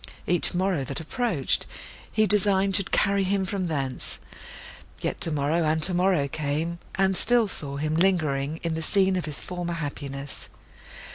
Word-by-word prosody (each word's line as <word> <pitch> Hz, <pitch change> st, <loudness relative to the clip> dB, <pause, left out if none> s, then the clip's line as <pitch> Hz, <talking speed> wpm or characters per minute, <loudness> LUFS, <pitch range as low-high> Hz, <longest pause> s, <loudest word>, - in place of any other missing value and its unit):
Each 175 Hz, 0 st, 0 dB
morrow 185 Hz, -5 st, 0 dB
that 135 Hz, 0 st, -4 dB
approached, 165 Hz, -, -1 dB, 0.4 s
he 215 Hz, 0 st, +2 dB
designed 200 Hz, -1 st, +3 dB
should 200 Hz, -2 st, 0 dB
carry 200 Hz, -1 st, +2 dB
him 190 Hz, 0 st, 0 dB
from 185 Hz, -2 st, -3 dB
thence; 135 Hz, -5 st, -2 dB, 0.8 s
yet -, -, -3 dB
tomorrow 155 Hz, +1 st, +2 dB
and 155 Hz, +1 st, +1 dB
tomorrow 180 Hz, -2 st, +3 dB
came, 155 Hz, +4 st, -3 dB, 0.2 s
and 190 Hz, 0 st, +2 dB
still 240 Hz, +2 st, +4 dB
saw 140 Hz, -7 st, +1 dB
him 155 Hz, +2 st, -2 dB
lingering 160 Hz, -5 st, +1 dB
in 165 Hz, -1 st, -1 dB
the 160 Hz, -, -3 dB
scene 190 Hz, +2 st, +2 dB
of 180 Hz, -, -2 dB
his 150 Hz, -3 st, -2 dB
former 175 Hz, -1 st, -5 dB
happiness. 140 Hz, -3 st, -6 dB
170 Hz, 150 wpm, -25 LUFS, 150-190 Hz, 0.8 s, still